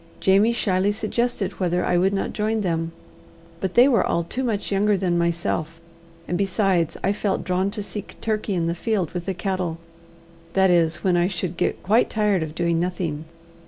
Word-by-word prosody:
Jamie 200 Hz, +4 st, +4 dB
shyly 195 Hz, -4 st, +1 dB
suggested 220 Hz, 0 st, -2 dB
whether 180 Hz, -1 st, +1 dB
I 180 Hz, -, +1 dB
would 185 Hz, +2 st, +3 dB
not 195 Hz, -, -2 dB
join 215 Hz, +1 st, 0 dB
them, 165 Hz, -3 st, -1 dB, 0.7 s
but 190 Hz, 0 st, -3 dB
they 245 Hz, +3 st, +7 dB
were 235 Hz, -8 st, +3 dB
all 170 Hz, -, 0 dB
too 250 Hz, +10 st, -3 dB
much 215 Hz, -5 st, -2 dB
younger 200 Hz, +1 st, +2 dB
than 180 Hz, -2 st, 0 dB
myself; 170 Hz, -1 st, -1 dB, 0.5 s
and 175 Hz, -, -1 dB
besides 195 Hz, -4 st, +1 dB
I 195 Hz, -, +2 dB
felt 205 Hz, -1 st, -1 dB
drawn 185 Hz, +2 st, 0 dB
to 210 Hz, 0 st, -5 dB
seek 205 Hz, 0 st, -8 dB
Turkey 215 Hz, -2 st, -1 dB
in 170 Hz, -2 st, 0 dB
the 170 Hz, -, 0 dB
field 190 Hz, -2 st, -1 dB
with 175 Hz, -1 st, -5 dB
the 190 Hz, -, -1 dB
cattle 180 Hz, -2 st, -2 dB, 0.8 s
that 190 Hz, -1 st, +4 dB
is, 170 Hz, -2 st, +2 dB
when 185 Hz, -2 st, +3 dB
I 175 Hz, 0 st, +3 dB
should 185 Hz, -2 st, -3 dB
get -, -, -1 dB
quite 220 Hz, +6 st, +3 dB
tired 210 Hz, -4 st, +1 dB
of 155 Hz, -1 st, -5 dB
doing 170 Hz, -1 st, +1 dB
nothing. 170 Hz, -3 st, -2 dB
185 Hz, 190 wpm, -23 LUFS, 170-205 Hz, 0.8 s, they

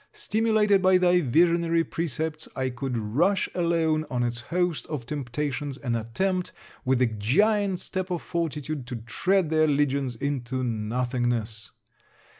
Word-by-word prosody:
Stimulated 215 Hz, -2 st, +2 dB
by 185 Hz, 0 st, +5 dB
thy 180 Hz, 0 st, +4 dB
visionary 165 Hz, +3 st, +3 dB
precepts, 160 Hz, -1 st, -3 dB
I 130 Hz, -1 st, -1 dB
could 125 Hz, 0 st, -3 dB
rush 145 Hz, -, +1 dB
alone 165 Hz, -3 st, +1 dB
on 125 Hz, -1 st, 0 dB
its 120 Hz, 0 st, -2 dB
host 175 Hz, +5 st, -1 dB
of 145 Hz, -7 st, -4 dB
temptations, 145 Hz, +1 st, -3 dB
and 120 Hz, -5 st, -2 dB
attempt 180 Hz, -, -1 dB, 0.3 s
with 130 Hz, -1 st, +2 dB
the 125 Hz, -, +4 dB
giant 185 Hz, -, +1 dB
step 185 Hz, 0 st, -3 dB
of 175 Hz, -2 st, -3 dB
fortitude 155 Hz, -5 st, -3 dB
to 125 Hz, -, -5 dB
tread 165 Hz, -, 0 dB
their 155 Hz, 0 st, +4 dB
legions 140 Hz, -3 st, +1 dB
into 130 Hz, 0 st, -2 dB
nothingness! 120 Hz, -1 st, -2 dB
150 Hz, 135 wpm, -26 LUFS, 125-175 Hz, 0.3 s, by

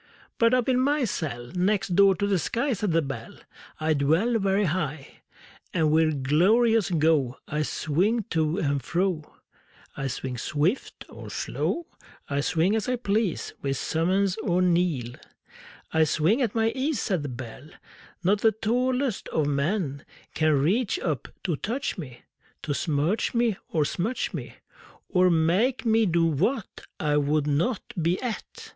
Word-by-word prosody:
But 230 Hz, +2 st, +5 dB
up 250 Hz, -2 st, +1 dB
in 255 Hz, -1 st, +3 dB
my 285 Hz, +2 st, +2 dB
cell 120 Hz, -, -4 dB
Next 195 Hz, +2 st, +1 dB
door 195 Hz, 0 st, +6 dB
to 200 Hz, -, -1 dB
the 200 Hz, -2 st, +1 dB
sky, 250 Hz, -, -1 dB
Said 210 Hz, -3 st, -1 dB
the 165 Hz, 0 st, +2 dB
Bell, 135 Hz, -5 st, -6 dB, 0.4 s
I 155 Hz, 0 st, +2 dB
dwell 165 Hz, +12 st, +2 dB
Very 195 Hz, +1 st, +2 dB
high; 155 Hz, -5 st, -3 dB, 0.5 s
And 160 Hz, -3 st, +3 dB
with 155 Hz, -3 st, +2 dB
glorious 215 Hz, -, +3 dB
go 155 Hz, -7 st, +2 dB
I 150 Hz, +1 st, -1 dB
swing 180 Hz, -, 0 dB
to 160 Hz, +1 st, +1 dB
and 145 Hz, -7 st, 0 dB
fro; 175 Hz, +1 st, -2 dB, 0.6 s
I 135 Hz, -, -3 dB
swing 130 Hz, -1 st, -4 dB
swift 155 Hz, -, -1 dB
or -, -, -10 dB
slow, 340 Hz, -, -2 dB, 0.4 s
I 140 Hz, 0 st, -1 dB
swing 165 Hz, +7 st, +1 dB
as 220 Hz, +2 st, -1 dB
I 250 Hz, -, +2 dB
please, 210 Hz, -5 st, -1 dB
With 135 Hz, -1 st, -1 dB
summons 185 Hz, +6 st, +1 dB
or 180 Hz, -5 st, 0 dB
knell; 170 Hz, -9 st, +1 dB, 0.8 s
I 160 Hz, 0 st, +4 dB
swing 165 Hz, -, +2 dB
at 235 Hz, -4 st, 0 dB
my 225 Hz, 0 st, +2 dB
ease, 270 Hz, +2 st, -1 dB
Said 185 Hz, -7 st, 0 dB
the 145 Hz, -, -4 dB
Bell: 125 Hz, +3 st, -8 dB, 0.5 s
Not 200 Hz, +3 st, +2 dB
the 220 Hz, -1 st, +4 dB
tallest 250 Hz, +2 st, 0 dB
of 155 Hz, -, 0 dB
men 145 Hz, +1 st, -1 dB, 0.3 s
Can 155 Hz, 0 st, +2 dB
reach 205 Hz, -, +1 dB
up 150 Hz, -8 st, -2 dB, 0.2 s
to 175 Hz, -4 st, 0 dB
touch 230 Hz, -, -3 dB
me, 130 Hz, -7 st, -9 dB, 0.4 s
To 145 Hz, -, -1 dB
smirch 155 Hz, -, 0 dB
me 235 Hz, -4 st, +2 dB
or 155 Hz, -2 st, +1 dB
smutch 205 Hz, -, -2 dB
me, -, -, -6 dB, 0.5 s
Or 185 Hz, -1 st, +4 dB
make 180 Hz, +11 st, +2 dB
me 225 Hz, -1 st, +3 dB
do 170 Hz, -1 st, +2 dB
what 185 Hz, -, -1 dB
I 150 Hz, -1 st, +1 dB
would 145 Hz, +1 st, +1 dB
not 160 Hz, -, -1 dB
be 170 Hz, +3 st, +1 dB
at! 245 Hz, -4 st, -6 dB
175 Hz, 155 wpm, -26 LUFS, 150-220 Hz, 0.8 s, door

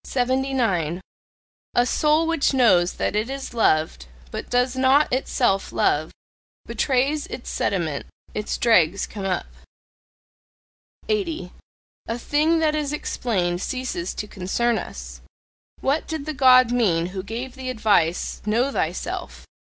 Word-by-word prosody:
A 245 Hz, -, +4 dB
soul 305 Hz, +5 st, +2 dB
which 325 Hz, -4 st, +1 dB
knows 185 Hz, -9 st, +4 dB
that -, -, -2 dB
it 215 Hz, +4 st, 0 dB
is 270 Hz, -2 st, -6 dB
loved, 155 Hz, -, +1 dB, 0.2 s
but -, -, -6 dB
does 250 Hz, +1 st, +1 dB
not 265 Hz, +2 st, +3 dB
itself 245 Hz, -6 st, +1 dB
love, 155 Hz, +2 st, +1 dB, 0.5 s
betrays 280 Hz, +3 st, 0 dB
its 250 Hz, -, -7 dB
sediment: 165 Hz, -7 st, -1 dB, 0.3 s
its 210 Hz, 0 st, -3 dB
dregs 195 Hz, -5 st, +3 dB
come 200 Hz, -2 st, -7 dB
up. 185 Hz, -2 st, -1 dB, 1.6 s
80. 375 Hz, -6 st, -2 dB, 0.6 s
A 230 Hz, -, -2 dB
thing 300 Hz, +6 st, +2 dB
that 315 Hz, -1 st, +2 dB
is 300 Hz, -2 st, -1 dB
explained 185 Hz, -11 st, -1 dB
ceases 255 Hz, -10 st, -3 dB
to 210 Hz, -, -5 dB
concern 215 Hz, +5 st, 0 dB
us -, -, -9 dB, 0.6 s
What 280 Hz, +4 st, 0 dB
did 315 Hz, -3 st, -4 dB
the 310 Hz, -, -3 dB
God 255 Hz, -3 st, +6 dB
mean 190 Hz, -9 st, +2 dB
who 190 Hz, -, -3 dB
gave 235 Hz, +6 st, -6 dB
the 260 Hz, -1 st, -6 dB
advice, 205 Hz, -8 st, +1 dB
"Know 235 Hz, +6 st, +1 dB
thyself!" -, -, -4 dB
245 Hz, 125 wpm, -23 LUFS, 190-275 Hz, 1.6 s, God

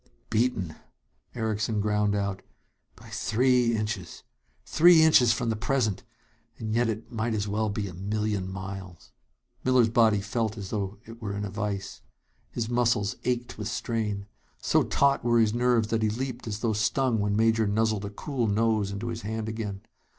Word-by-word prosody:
"Beaten!" 110 Hz, -7 st, 0 dB, 0.6 s
Erickson 110 Hz, -1 st, -1 dB
ground 105 Hz, 0 st, +1 dB
out. 100 Hz, -1 st, -2 dB, 0.5 s
"By -, -, -15 dB
three 125 Hz, 0 st, +2 dB
inches! 105 Hz, -6 st, -4 dB, 0.4 s
Three 165 Hz, 0 st, +6 dB
inches 130 Hz, -7 st, +6 dB
from 115 Hz, 0 st, 0 dB
the -, -, -1 dB
present... 115 Hz, -2 st, 0 dB, 0.6 s
and 110 Hz, -1 st, -4 dB
yet 120 Hz, 0 st, +2 dB
it 110 Hz, 0 st, -5 dB
might 115 Hz, 0 st, -1 dB
as 105 Hz, -1 st, -1 dB
well 105 Hz, +1 st, 0 dB
be 100 Hz, 0 st, -3 dB
a 90 Hz, -, -8 dB
million 100 Hz, 0 st, -2 dB
miles!" 95 Hz, -2 st, -8 dB, 0.5 s
Miller's 130 Hz, -3 st, +4 dB
body 110 Hz, -3 st, +4 dB
felt 110 Hz, +2 st, -2 dB
as 100 Hz, -2 st, -7 dB
though 100 Hz, -2 st, -3 dB
it 115 Hz, +1 st, -12 dB
were 100 Hz, -2 st, -3 dB
in 100 Hz, 0 st, -3 dB
a 100 Hz, -, -6 dB
vise. 100 Hz, -1 st, -4 dB, 0.5 s
His 115 Hz, -2 st, -3 dB
muscles 115 Hz, -4 st, +1 dB
ached 120 Hz, -2 st, -2 dB
with 105 Hz, -, -3 dB
strain. 105 Hz, -4 st, -2 dB, 0.3 s
So -, -, +2 dB
taut 140 Hz, 0 st, +2 dB
were 120 Hz, 0 st, +3 dB
his 110 Hz, -2 st, +3 dB
nerves 120 Hz, -2 st, +2 dB
that 115 Hz, -1 st, 0 dB
he 110 Hz, -, +2 dB
leaped 125 Hz, +2 st, -4 dB
as 105 Hz, -1 st, -4 dB
though 115 Hz, -2 st, +1 dB
stung 115 Hz, +3 st, +1 dB
when 100 Hz, 0 st, 0 dB
Major 110 Hz, 0 st, +3 dB
nuzzled 110 Hz, 0 st, +1 dB
a -, -, -4 dB
cool 120 Hz, +3 st, -2 dB
nose 110 Hz, -1 st, +1 dB
into 100 Hz, +4 st, -4 dB
his 115 Hz, 0 st, -4 dB
hand 110 Hz, +1 st, -4 dB
again. 105 Hz, -3 st, -4 dB
110 Hz, 170 wpm, -27 LUFS, 100-115 Hz, 0.6 s, Three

